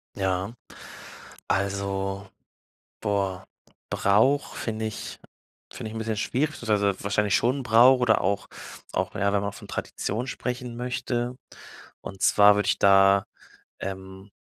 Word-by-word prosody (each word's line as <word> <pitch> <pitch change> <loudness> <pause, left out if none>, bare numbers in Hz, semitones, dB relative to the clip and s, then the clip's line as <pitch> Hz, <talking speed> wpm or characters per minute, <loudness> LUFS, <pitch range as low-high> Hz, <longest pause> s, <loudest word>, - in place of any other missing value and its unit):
Ja. 95 +3 -1 1.0
Also, 100 0 -2 0.7
boah, 95 -2 -1 0.4
Brauch 110 +9 +2
finde 110 -1 -3
ich 110 -2 -6 0.5
finde 110 - -6
ich 115 - -9
'n - - -3
bisschen 110 -1 -2
schwierig, 130 +8 0
beziehungsweise 105 -7 0
wahrscheinlich 100 0 +1
schon 130 +4 +1
Brauch 120 +3 +6
oder 120 -3 +3
auch 100 +1 -1 0.5
auch, - - -1
ja, 100 0 +1
wenn 100 - +2
man 100 - -3
von - - -12
Tradition 115 +5 -3
sprechen 125 -2 -4
möchte. 125 0 -2 0.7
Und 95 -1 -9
zwar 105 0 +6
würde 105 - 0
ich - - +1
da, 100 0 +5 0.5
ähm, 95 +1 -7
105 Hz, 130 wpm, -26 LUFS, 100-120 Hz, 1.0 s, Brauch